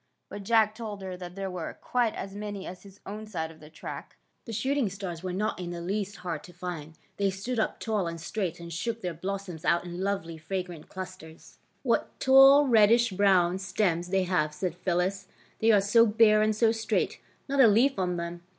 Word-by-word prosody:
" -, -, -51 dB
But 205 Hz, -, -6 dB
Jack 220 Hz, +1 st, +3 dB
told 215 Hz, -3 st, -7 dB
her 185 Hz, -1 st, -5 dB
that 180 Hz, 0 st, -9 dB
there 195 Hz, -1 st, -4 dB
were 175 Hz, -3 st, -6 dB
quite 240 Hz, -3 st, 0 dB
as 195 Hz, 0 st, -6 dB
many 205 Hz, -1 st, -6 dB
on -, -, -5 dB
his 195 Hz, +2 st, -16 dB
own 215 Hz, +2 st, -7 dB
side 160 Hz, -6 st, -4 dB
of 160 Hz, -, -16 dB
the 150 Hz, -, -13 dB
track. 160 Hz, -, -8 dB, 0.3 s
The 230 Hz, -, -7 dB
shooting 260 Hz, +2 st, 0 dB
stars 185 Hz, -4 st, -6 dB
were 185 Hz, 0 st, -4 dB
not 195 Hz, +3 st, -2 dB
in 180 Hz, -1 st, -4 dB
the 175 Hz, 0 st, -5 dB
least 200 Hz, +3 st, -3 dB
hard 165 Hz, -4 st, -3 dB
to 175 Hz, -, -14 dB
find. 165 Hz, -3 st, -7 dB, 0.2 s
They 200 Hz, -1 st, +2 dB
stood 205 Hz, +6 st, -3 dB
up 220 Hz, -, -1 dB
tall 210 Hz, -5 st, -1 dB
and 165 Hz, 0 st, -5 dB
straight, 175 Hz, 0 st, -3 dB
and 170 Hz, 0 st, -8 dB
shook 230 Hz, +7 st, -3 dB
their 180 Hz, -3 st, -3 dB
blossoms 185 Hz, -1 st, -5 dB
out 170 Hz, -, +2 dB
in 175 Hz, +1 st, -6 dB
lovely 180 Hz, -5 st, -2 dB
fra 185 Hz, +4 st, -3 dB
grant 175 Hz, -4 st, -11 dB
clusters. 185 Hz, -4 st, -10 dB
^^ -, -, -40 dB, 0.2 s
What -, -, 0 dB
taU, 270 Hz, +2 st, +8 dB
reddish 230 Hz, -1 st, +5 dB
brown 185 Hz, -2 st, +3 dB
stems 180 Hz, -2 st, 0 dB
they 190 Hz, +1 st, +1 dB
have," 155 Hz, -5 st, 0 dB
said 180 Hz, +1 st, -2 dB
Phyllis. 185 Hz, +2 st, -1 dB, 0.2 s
'' -, -, -33 dB
They 225 Hz, +1 st, +4 dB
are 205 Hz, -2 st, +5 dB
so 230 Hz, +4 st, +5 dB
bare 215 Hz, 0 st, +5 dB
and 215 Hz, 0 st, +2 dB
so 225 Hz, +1 st, +4 dB
straight, 225 Hz, -1 st, -1 dB, 0.3 s
not 275 Hz, -1 st, +3 dB
a 245 Hz, -, +8 dB
leaf 230 Hz, +3 st, +3 dB
on 180 Hz, -1 st, 0 dB
them. 170 Hz, 0 st, -5 dB
195 Hz, 220 wpm, -28 LUFS, 175-215 Hz, 0.3 s, taU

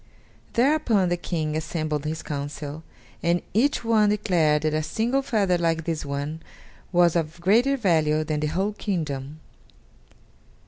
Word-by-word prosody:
Thereupon 235 Hz, -, +3 dB
the 175 Hz, -, +1 dB
King 160 Hz, -3 st, -3 dB
assembled 155 Hz, -2 st, -2 dB
his 155 Hz, +1 st, -3 dB
council, 145 Hz, +1 st, -5 dB, 0.4 s
and 170 Hz, +1 st, +1 dB
each 250 Hz, +7 st, +2 dB
one 220 Hz, -2 st, +4 dB
declared 165 Hz, -8 st, +2 dB
that 155 Hz, -1 st, +1 dB
a 155 Hz, -, +1 dB
single 230 Hz, -, 0 dB
feather 200 Hz, -9 st, +1 dB
like 165 Hz, -1 st, 0 dB
this 160 Hz, -1 st, -2 dB
one 145 Hz, +3 st, -4 dB, 0.5 s
was 175 Hz, -2 st, +4 dB
of 165 Hz, 0 st, -1 dB
greater 235 Hz, +10 st, +3 dB
value 155 Hz, -, +2 dB
than 155 Hz, -1 st, -2 dB
the 150 Hz, -, 0 dB
whole 195 Hz, +7 st, -1 dB
kingdom. 155 Hz, -8 st, -4 dB
165 Hz, 140 wpm, -25 LUFS, 155-205 Hz, 0.5 s, one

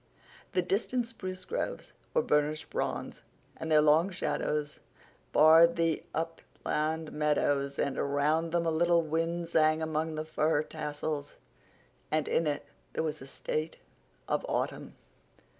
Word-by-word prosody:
The 180 Hz, -, +2 dB
distant 230 Hz, +6 st, 0 dB
spruce 185 Hz, -5 st, -6 dB
groves -, -, -4 dB, 0.2 s
were 475 Hz, -, +4 dB
burnished 150 Hz, +1 st, 0 dB
bronze, -, -, -3 dB, 0.3 s
and 160 Hz, -, -5 dB
their 150 Hz, -1 st, +6 dB
long 155 Hz, +5 st, +5 dB
shadows 150 Hz, -4 st, -2 dB, 0.5 s
barred 165 Hz, +2 st, +7 dB
the 165 Hz, -2 st, +1 dB
upland 160 Hz, -1 st, -3 dB
meadows. 145 Hz, -2 st, +1 dB
But 140 Hz, -1 st, -1 dB
around 150 Hz, +4 st, +1 dB
them 170 Hz, 0 st, +1 dB
a 165 Hz, -, +2 dB
little 170 Hz, +1 st, +3 dB
wind 165 Hz, +2 st, -1 dB
sang 155 Hz, -1 st, +3 dB
among 160 Hz, 0 st, -1 dB
the 155 Hz, 0 st, -3 dB
fir 155 Hz, -1 st, +1 dB
tassels, 150 Hz, -1 st, -4 dB, 0.7 s
and 155 Hz, -1 st, 0 dB
in 165 Hz, -, +1 dB
it 145 Hz, -1 st, -2 dB, 0.3 s
there -, -, -1 dB
was 155 Hz, -1 st, -2 dB
the 135 Hz, -, -11 dB, 0.2 s
note 155 Hz, +1 st, -1 dB, 0.5 s
of -, -, 0 dB
autumn. -, -, -2 dB
155 Hz, 135 wpm, -30 LUFS, 150-165 Hz, 0.7 s, barred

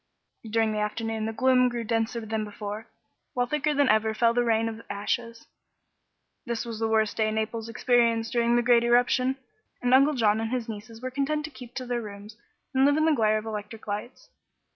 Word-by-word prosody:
During 225 Hz, 0 st, +2 dB
the 215 Hz, -, -2 dB
afternoon 220 Hz, +1 st, -2 dB
the -, -, -2 dB
gloom 255 Hz, +1 st, +3 dB
grew 240 Hz, -1 st, -4 dB
denser 230 Hz, +1 st, -1 dB
than 220 Hz, 0 st, -2 dB
before, 210 Hz, +1 st, -6 dB, 0.5 s
while 245 Hz, 0 st, +2 dB
thicker 300 Hz, +3 st, 0 dB
than 285 Hz, -1 st, +3 dB
ever 220 Hz, 0 st, +2 dB
fell 230 Hz, +1 st, +3 dB
the 245 Hz, 0 st, +2 dB
rain 225 Hz, -1 st, +2 dB
of 225 Hz, 0 st, -6 dB
ashes. 230 Hz, +3 st, -3 dB, 1.0 s
This 235 Hz, -2 st, -3 dB
was 230 Hz, -2 st, -6 dB
the 225 Hz, -, +1 dB
worst 220 Hz, -1 st, +1 dB
day 220 Hz, -1 st, +2 dB
Naples 220 Hz, +1 st, -3 dB
experienced 230 Hz, -1 st, +2 dB
during 235 Hz, 0 st, +2 dB
the 240 Hz, -, +3 dB
great 235 Hz, -1 st, +5 dB
eruption, 245 Hz, +2 st, +3 dB, 0.4 s
and 245 Hz, 0 st, +1 dB
Uncle 275 Hz, +3 st, +5 dB
John 220 Hz, -3 st, +2 dB
and 225 Hz, -, -2 dB
his 250 Hz, -1 st, -2 dB
nieces 225 Hz, +2 st, -9 dB
were 255 Hz, -, -3 dB
content 290 Hz, +3 st, -1 dB
to 305 Hz, -, -9 dB
keep 250 Hz, -3 st, -12 dB
their 245 Hz, -2 st, -2 dB
rooms 205 Hz, 0 st, -9 dB, 0.4 s
and 265 Hz, 0 st, +3 dB
live 285 Hz, +2 st, +4 dB
in 310 Hz, -, +3 dB
the 320 Hz, -, +4 dB
glare 215 Hz, -5 st, +2 dB
of 215 Hz, -, -5 dB
electric 215 Hz, 0 st, -6 dB
lights. 210 Hz, +5 st, -6 dB
230 Hz, 200 wpm, -27 LUFS, 220-245 Hz, 1.0 s, great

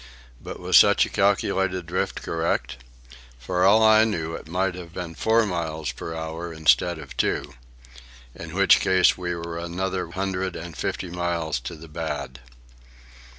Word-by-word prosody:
But -, -, -8 dB
was -, -, +4 dB
such -, -, +6 dB
calculated 95 Hz, -2 st, +1 dB
drift 90 Hz, +2 st, -3 dB
correct? 80 Hz, -5 st, -2 dB, 0.6 s
For 90 Hz, +9 st, -1 dB
all 105 Hz, +4 st, +6 dB
I 110 Hz, 0 st, +6 dB
knew, 80 Hz, -7 st, -2 dB
it 80 Hz, -, -8 dB
might 90 Hz, +2 st, -1 dB
have 85 Hz, -1 st, -10 dB
been 90 Hz, -2 st, -5 dB
four 110 Hz, +6 st, +2 dB
miles 80 Hz, -6 st, -3 dB
per 80 Hz, +6 st, -7 dB
hour 80 Hz, +1 st, -5 dB
instead 80 Hz, +1 st, +2 dB
of -, -, -10 dB
two. -, -, -1 dB, 0.8 s
In 80 Hz, +1 st, -9 dB
which 100 Hz, 0 st, +5 dB
case 95 Hz, -2 st, +4 dB
we 90 Hz, -1 st, -3 dB
were 85 Hz, 0 st, -5 dB
another 90 Hz, +1 st, -3 dB
hundred 95 Hz, 0 st, -3 dB
and 85 Hz, -1 st, -8 dB
fifty 90 Hz, -, -4 dB
miles 85 Hz, -4 st, -2 dB
to 60 Hz, +6 st, -7 dB
the 80 Hz, +1 st, -12 dB
bad. 75 Hz, -4 st, -5 dB
85 Hz, 150 wpm, -24 LUFS, 80-95 Hz, 0.8 s, such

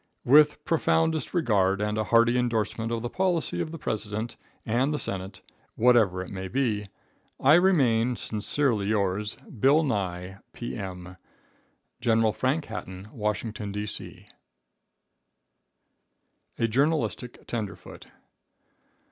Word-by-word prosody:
With 150 Hz, +3 st, +5 dB
profoundest 160 Hz, -1 st, +1 dB
regard, 100 Hz, -, +2 dB
and 105 Hz, 0 st, -1 dB
a 110 Hz, 0 st, -1 dB
hearty 115 Hz, +2 st, +4 dB
endorsement 115 Hz, -2 st, -1 dB
of 115 Hz, -1 st, -2 dB
the 120 Hz, -, -2 dB
policy 185 Hz, -3 st, 0 dB
of -, -, -3 dB
the 165 Hz, -, -6 dB
President 110 Hz, -2 st, -3 dB, 0.3 s
and 125 Hz, +6 st, +1 dB
the 150 Hz, -, -1 dB
Senate, 95 Hz, -5 st, -5 dB, 0.3 s
whatever 110 Hz, -6 st, +4 dB
it -, -, -10 dB
may 95 Hz, -1 st, -5 dB
be, 110 Hz, -3 st, -1 dB, 0.5 s
I 140 Hz, +3 st, +5 dB
remain, 130 Hz, -10 st, +4 dB
sincerely 110 Hz, 0 st, 0 dB
yours, 105 Hz, 0 st, 0 dB, 0.2 s
Bill 145 Hz, +7 st, +5 dB
Nye, 95 Hz, -, -3 dB
P.M. 95 Hz, -6 st, -6 dB, 0.8 s
Gen. 115 Hz, -1 st, +3 dB
Frank 140 Hz, +7 st, -1 dB
Hatton, 95 Hz, -2 st, -8 dB
Washington, 105 Hz, -2 st, -3 dB
D.C. 105 Hz, +1 st, -6 dB, 2.3 s
A 115 Hz, -, +1 dB
Journalistic 135 Hz, 0 st, -1 dB
Tenderfoot. 110 Hz, -4 st, -6 dB
115 Hz, 110 wpm, -27 LUFS, 105-135 Hz, 2.3 s, With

